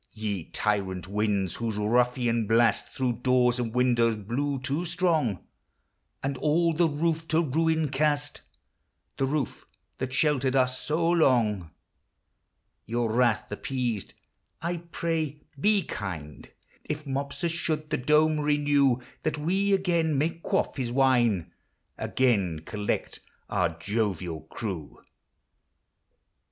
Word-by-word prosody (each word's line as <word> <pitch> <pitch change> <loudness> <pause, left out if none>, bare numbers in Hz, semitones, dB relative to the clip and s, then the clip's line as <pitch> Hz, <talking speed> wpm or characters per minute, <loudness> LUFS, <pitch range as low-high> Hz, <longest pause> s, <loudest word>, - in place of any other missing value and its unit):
Ye 105 -6 -3
tyrant 95 -4 -1
winds, 100 -2 0
whose 115 -3 -2
ruffian 120 +1 +1
blast 115 +1 +3
Through 125 -3 -2
doors 125 -1 +3
and 115 -2 -2
windows 120 -2 +3
blew 125 +7 -2
too 140 +6 -2
strong, 160 - 0 0.8
And 135 -1 -2
all 165 +2 +2
the 165 +1 +3
roof 160 +2 -1
to 165 +1 +2
ruin 160 +2 +1
cast, 145 +1 0 0.4
— - - -49
The 135 - +2
roof 145 -2 -2 0.3
that 130 0 -3
sheltered 135 -2 +2
us 130 -1 +2
so 165 +2 0
long, 120 - +3 0.6
— - - -50
Your 115 0 0
wrath 120 -3 +2
appeased, 120 -1 -3 0.4
I 170 +3 -2
pray 155 -3 -2 0.2
be 205 +3 +3
kind 85 - -6 0.3
If 150 0 -4
Mopsus 140 +5 -2
should 155 -2 -2
the - - +2
dome 150 +3 +3
renew, 145 -3 +3 0.2
That 155 -1 -1
we 190 +6 +1
again 170 -6 +2
may 155 +4 +2
quaff 165 - -1
his 125 -3 -2
wine, 120 -9 +2 0.5
Again 100 -11 +1
collect 105 -1 -3 0.3
our 80 -1 0
jovial 90 -4 -2
crew. 95 - -5
130 Hz, 120 wpm, -27 LUFS, 110-155 Hz, 0.8 s, blast